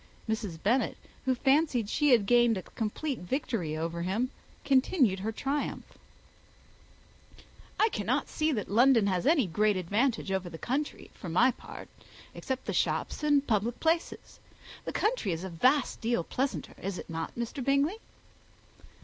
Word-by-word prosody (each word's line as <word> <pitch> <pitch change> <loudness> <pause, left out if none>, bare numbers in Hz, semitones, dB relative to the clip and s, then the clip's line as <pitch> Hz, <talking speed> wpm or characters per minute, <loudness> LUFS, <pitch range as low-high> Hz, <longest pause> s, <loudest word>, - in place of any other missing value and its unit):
Mrs. 215 -6 -2
Bennet, 245 +6 +1 0.3
who 260 -1 +2
fancied 270 -3 +2
she 295 +7 +2
had 235 -6 +5
gained 240 0 +4
a 185 - -5
complete 250 +5 -3
victory 180 - -2
over 165 +1 -3
him, 215 +9 -1 0.3
continued 260 - +3
her 215 +4 -2
triumph, 275 +6 -3 1.9
"I 440 - +5
cannot - - -1
see 310 0 0
that 215 -8 -2
London 235 +1 +5
has 185 +2 0
any 300 -6 +4
great 205 +3 +1
advantage 205 +4 0
over 190 -2 -1
the 165 - -8
country, 275 - -3
for 180 - -8
my 235 +11 +4
part, - - -11 0.5
except 260 -1 -4
the - - -2
shops - - 0
and 290 -2 +3
public 225 +1 0
places. 330 +1 -1 0.5
The - - -3
country 425 - 0
is 165 +2 -5
a 190 - -4
vast 255 - +2
deal 230 -6 0
pleasanter, 265 +9 -3
is 190 -1 -3
not 165 -1 -4
it, - - -8
Mr. 235 +3 -3
Bingley?" 280 - +1
235 Hz, 150 wpm, -29 LUFS, 195-275 Hz, 1.9 s, had